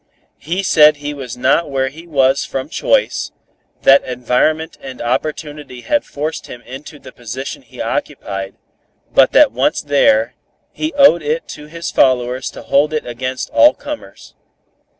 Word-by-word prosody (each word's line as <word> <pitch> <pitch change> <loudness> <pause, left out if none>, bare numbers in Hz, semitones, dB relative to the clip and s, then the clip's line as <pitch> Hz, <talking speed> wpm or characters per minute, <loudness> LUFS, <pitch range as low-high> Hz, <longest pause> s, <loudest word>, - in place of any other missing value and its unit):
He 175 +6 -3
said 155 -4 +6
he 145 0 -5
was 130 -5 -7
not 135 +6 +2
where 135 -1 0
he 165 +5 -13
was 135 -3 +2
from 135 +2 -5
choice, - - 0 0.5
that 135 +1 +6
environment 125 +6 0
and 130 -2 -9
opportunity 145 +1 -4
had 295 - 0
forced 155 +3 -5
him 120 - -10
into 135 +4 -10
the - - -13
position 125 +3 -7
he - - -16
occupied, 95 -1 -4 0.6
but - - +5
that - - +6
once - - +1
there, 125 -5 +2 0.4
he 310 +1 -3
owed 275 -12 +6
it 155 +2 -2
to 150 - -9
his 165 +2 -6
followers 125 0 +2
to - - -11
hold 150 +2 +2
it 155 - -2
against 130 +2 -4
all 300 - +6
comers. 295 0 -9
145 Hz, 150 wpm, -17 LUFS, 130-155 Hz, 0.6 s, said